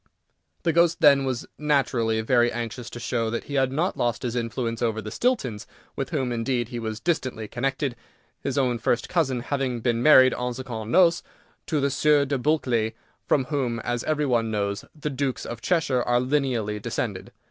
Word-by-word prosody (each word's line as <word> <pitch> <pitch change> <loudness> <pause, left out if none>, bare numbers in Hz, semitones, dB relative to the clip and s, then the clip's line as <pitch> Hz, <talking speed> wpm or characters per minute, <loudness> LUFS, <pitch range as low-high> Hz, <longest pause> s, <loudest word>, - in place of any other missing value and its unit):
The 165 - +2
ghost, 170 0 +3
then, 140 -4 +6
was 130 -2 -2
naturally 130 -7 +1
very 120 +1 +3
anxious 120 0 -5
to 120 - -8
show 120 -2 -1
that 115 +1 -3
he 145 - -9
had 135 -2 +2
not 165 +7 0
lost 120 0 -1
his 120 -1 -2
influence 115 -1 -2
over 115 -2 0
the 110 -1 -6
Stiltons, 130 - -1 0.3
with - - -3
whom, 130 -2 -1
indeed, 120 0 -1
he 120 -2 -5
was 110 -1 -4
distantly 130 -10 -2
connected, 135 +2 -2 0.4
his 135 -1 -3
own 125 -3 +1
first 115 +2 0
cousin 135 -8 0
having 130 -2 -2
been 115 0 0
married 130 -3 +7
en 125 0 -3
secondes 115 -4 -6
noces 175 -1 +5 0.5
to 155 - 0
the 140 0 +1
Sieur 145 +1 +3
de 140 -1 -1
Bulkeley, 120 -6 +1 0.3
from 135 - +3
whom, 125 -5 -1
as 120 +1 -2
every 150 -1 +1
one 120 -4 +1
knows, 100 -2 -2 0.2
the 150 0 -3
Dukes 135 -1 -2
of 115 -1 -6
Cheshire 150 -7 +1
are 120 0 +2
lineally 125 -6 0
descended. - - -4
125 Hz, 185 wpm, -25 LUFS, 115-140 Hz, 0.5 s, married